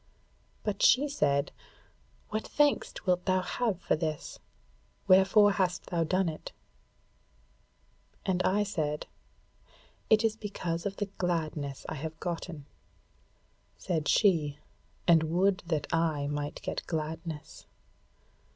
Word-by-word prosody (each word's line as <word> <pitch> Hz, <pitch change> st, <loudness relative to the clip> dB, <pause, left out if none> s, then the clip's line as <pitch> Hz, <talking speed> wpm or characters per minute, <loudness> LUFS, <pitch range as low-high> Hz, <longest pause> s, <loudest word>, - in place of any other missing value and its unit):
But 205 Hz, -2 st, -2 dB
she 280 Hz, +3 st, +6 dB
said: 140 Hz, -, +1 dB, 0.8 s
'What 215 Hz, +1 st, -3 dB
thanks 290 Hz, -1 st, +2 dB
wilt 180 Hz, -1 st, +1 dB
thou 185 Hz, -1 st, +2 dB
have 215 Hz, -2 st, -1 dB
for -, -, +1 dB
this? 155 Hz, -1 st, -4 dB, 0.7 s
Wherefore 195 Hz, +2 st, +6 dB
hast 185 Hz, -3 st, 0 dB
thou 170 Hz, -2 st, +2 dB
done 185 Hz, +3 st, +1 dB
it?' 155 Hz, -1 st, -5 dB, 1.7 s
And 185 Hz, -1 st, +1 dB
I 200 Hz, +3 st, +2 dB
said, 155 Hz, -7 st, -2 dB, 1.0 s
'It 220 Hz, +1 st, +5 dB
is 220 Hz, -1 st, +2 dB
because 185 Hz, -5 st, -3 dB
of 200 Hz, -, -5 dB
the 205 Hz, -, -2 dB
gladness 155 Hz, -6 st, -2 dB
I -, -, -3 dB
have 160 Hz, 0 st, -6 dB
gotten.' 170 Hz, -4 st, -5 dB, 1.1 s
Said 160 Hz, -5 st, -2 dB
she, 160 Hz, -9 st, +3 dB, 0.5 s
'And 165 Hz, -2 st, +7 dB
would 185 Hz, +4 st, +2 dB
that 155 Hz, -4 st, 0 dB
I 160 Hz, -3 st, +1 dB
might 145 Hz, 0 st, -4 dB
get -, -, -3 dB
gladness!' 160 Hz, -1 st, -5 dB
175 Hz, 115 wpm, -30 LUFS, 155-195 Hz, 1.7 s, And